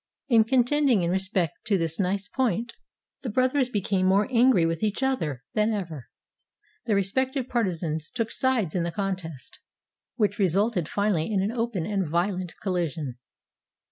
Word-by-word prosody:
In 225 -3 +5
contending 255 -2 +3
in 170 - 0
respect 190 -3 -1
to 205 -2 +2
this 165 0 -2
nice 195 +1 0
point 235 -2 -1 0.5
the 255 - -4
brothers 255 +3 +2
became 195 -4 0
more 200 +2 +3
angry 240 -7 +5
with 165 0 -1
each 215 +4 -1
other 155 - -1
than 215 +1 +2
ever. 165 - -5 0.8
Their 215 - +1
respective 260 +7 0
partisans 170 -10 -1
took 230 -2 -3
sides 245 -11 0
in 180 - 0
the 170 0 -1
contest, 180 -7 -5 0.6
which 215 -4 0
resulted 195 -1 +1
finally 200 -3 0
in 200 - +1
an 205 - 0
open 230 -7 -2
and 195 -5 -1
violent 180 0 -1
collision. 160 - -2
200 Hz, 150 wpm, -26 LUFS, 170-230 Hz, 0.8 s, In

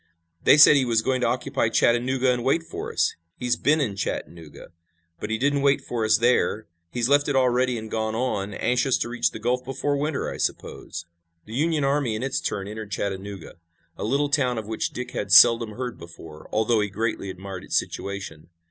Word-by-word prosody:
"They 145 - +6
said 150 0 +9
he 140 - +3
was 115 -3 +1
going 130 +1 0
to - - +2
occupy 130 -2 -1
Chattanooga 125 +3 +2
and 120 -1 -3
wait 140 +6 +1
for - - -6
us. - - +1 0.2
He's 125 -1 0
been 155 +2 +2
in 110 -9 -1
Chattanooga, 85 -5 -6 0.5
but - - -5
he 110 - 0
didn't 140 +3 +1
wait 140 0 +3
for 120 -2 -4
us 110 0 +4
there. 115 -2 +1 0.3
He's 120 -1 0
left 145 +1 +3
it 145 - 0
already 125 -1 +2
and 110 0 -8
gone 110 0 -2
on, 110 -5 -2
anxious 125 +1 +1
to - - -3
reach 125 0 0
the - - -8
Gulf 125 +3 -1
before 135 +2 -2
winter, 145 0 -2
I - - -5
suppose." 85 0 -4 0.4
The 110 - -10
Union 155 +3 0
army 135 -5 +1
in 110 - -4
its 135 0 -2
turn 100 -1 -3
entered 110 0 -7
Chattanooga, 95 -2 -5 0.4
a - - -6
little 140 +6 0
town 130 -5 +1
of 110 - -4
which 110 +1 -2
Dick 125 0 -6
had - - -4
seldom 115 -2 +7
heard 125 +1 -5
before, 80 -2 -12
although 110 +1 +2
he 105 - -1
greatly 110 -1 -3
admired 95 0 -8
its - - -1
situation. 95 -6 -5
120 Hz, 200 wpm, -24 LUFS, 105-135 Hz, 0.5 s, said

